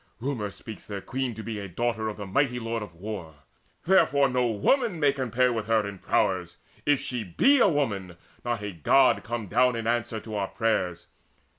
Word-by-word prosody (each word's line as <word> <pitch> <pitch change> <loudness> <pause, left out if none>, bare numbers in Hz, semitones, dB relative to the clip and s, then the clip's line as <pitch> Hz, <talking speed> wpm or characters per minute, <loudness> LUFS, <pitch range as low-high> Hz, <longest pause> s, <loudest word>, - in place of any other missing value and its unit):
Rumour 120 -5 -2
speaks 110 +2 -10
their 100 -1 -4
queen 130 +3 -3
to 110 - -7
be 110 -2 -4
A 100 - -5
daughter 110 +3 -1
of 105 - -7
the 100 - -6
mighty 125 +5 +1
Lord 115 0 -3
of 100 -5 -8
War. 90 -4 -7 0.5
Therefore 145 -7 +4
no 125 -1 +1
woman 180 - +1
may 145 -2 +4
compare 125 -2 +1
with 110 -2 -3
her 110 -2 +2
In 100 -2 -8
prowess - - 0 0.3
if 145 -2 +4
she 125 -3 -3
be 260 - +4
a 235 - +6
woman, 100 - -1 0.3
not 120 -3 -2
A 105 - -3
God 125 - +3
come 115 -1 -4
down 125 +5 +3
in 115 -1 -4
answer 115 -1 0
to 110 0 -9
our 100 -2 -1
prayers. 90 -7 -1
115 Hz, 195 wpm, -27 LUFS, 105-130 Hz, 0.5 s, a